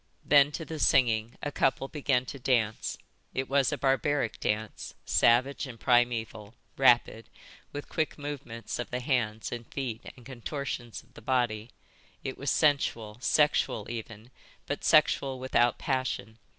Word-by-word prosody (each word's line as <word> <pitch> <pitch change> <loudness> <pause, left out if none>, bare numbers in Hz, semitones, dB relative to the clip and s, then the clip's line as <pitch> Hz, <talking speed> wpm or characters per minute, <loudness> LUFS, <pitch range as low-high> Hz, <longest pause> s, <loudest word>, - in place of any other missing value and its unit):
Then 145 0 +6
to 165 - -4
the 160 -1 -6
singing 115 -4 +3
a 145 - -2
couple 135 -1 +1
began 135 -4 0
to 140 - -8
dance. 120 -4 0 0.4
It 130 0 -1
was 140 0 +2
a 145 - -1
barbaric 135 -2 0
dance, 105 +1 -3
savage 130 +4 +3
and 120 -3 -10
primeval, 120 -3 +1 0.2
rapid, 120 -3 +3 0.4
with 145 0 -6
quick 160 -1 -2
movements 140 -7 -6
of 120 - -4
the 125 - -2
hands 120 -5 -1
and 120 -1 -7
feet 125 -5 -4 0.2
and 125 - -15
contortions 130 -2 -5
of - - -27
the - - -13
body; 115 -2 0 0.5
it 130 - -4
was 140 - -3
sensual, 120 -8 +1
sexual 145 -8 +2
even, 115 0 -8 0.3
but - - -4
sexual 135 -1 +3
without 125 -2 +2
passion. 130 -4 -2
125 Hz, 145 wpm, -29 LUFS, 115-140 Hz, 0.5 s, Then